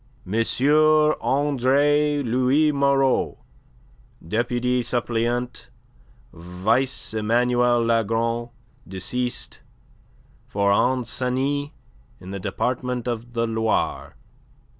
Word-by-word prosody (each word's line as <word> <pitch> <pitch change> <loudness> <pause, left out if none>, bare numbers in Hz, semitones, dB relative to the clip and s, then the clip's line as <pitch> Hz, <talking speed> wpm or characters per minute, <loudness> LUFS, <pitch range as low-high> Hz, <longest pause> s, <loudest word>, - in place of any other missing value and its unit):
"M. 95 - -7 0.9
Andre 145 +2 +2
Louis 130 +5 +2
Moreau, 140 -2 +1 0.9
deputy 120 +4 0
suppleant, 120 - -2 0.6
vice 95 +11 -1
Emmanuel 120 +2 +2
Lagron, 115 +1 0 0.4
deceased, 120 +7 -4 0.9
for 100 0 +1
Ancenis 130 +5 0 0.5
in 95 +1 -10
the 100 - -5
Department 125 +4 -3
of 120 0 -4
the 115 -1 0
Loire." 110 -1 -1
120 Hz, 75 wpm, -23 LUFS, 115-130 Hz, 0.9 s, Andre